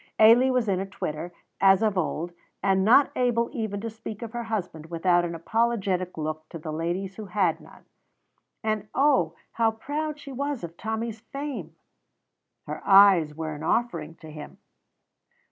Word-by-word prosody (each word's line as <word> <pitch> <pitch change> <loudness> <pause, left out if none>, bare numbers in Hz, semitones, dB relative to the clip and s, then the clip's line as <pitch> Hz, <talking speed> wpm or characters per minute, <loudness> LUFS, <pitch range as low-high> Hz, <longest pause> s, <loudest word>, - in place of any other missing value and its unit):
Ailie 230 +4 +7
was 250 -3 +1
in 190 -2 +1
a 195 - -2
twitter, 165 -2 -5 0.3
as 195 +2 +5
of 215 -2 +2
old, 175 -1 -1 0.3
and 190 -1 +3
not 245 +7 +6
able 240 -2 +1
even 220 -6 -3
yet - - -8
to 230 - -2
speak 220 0 -7
of 225 - -6
her 240 0 -4
husband 185 -8 -4
without 175 +1 +2
an 170 -1 -3
apologetic 190 -2 0
look 155 0 -4
to - - -7
the 155 -1 -6
ladies 175 +4 -3
who 215 - -6
had 190 +1 +1
none. - - -17 0.8
And 215 -1 -1
oh, 265 - +3 0.2
how 230 -1 +2
proud 295 +7 -4
she 285 -1 -9
was 280 -2 -3
of 170 0 -7
Tommy's 220 +2 -4
fame! 245 - -6 0.9
Her - - -6
eyes 195 -6 +6
were 160 0 -4
an 150 - -8
offering 165 -4 -1
to 160 -1 -12
him. 150 -1 -10
200 Hz, 170 wpm, -26 LUFS, 170-230 Hz, 0.9 s, Ailie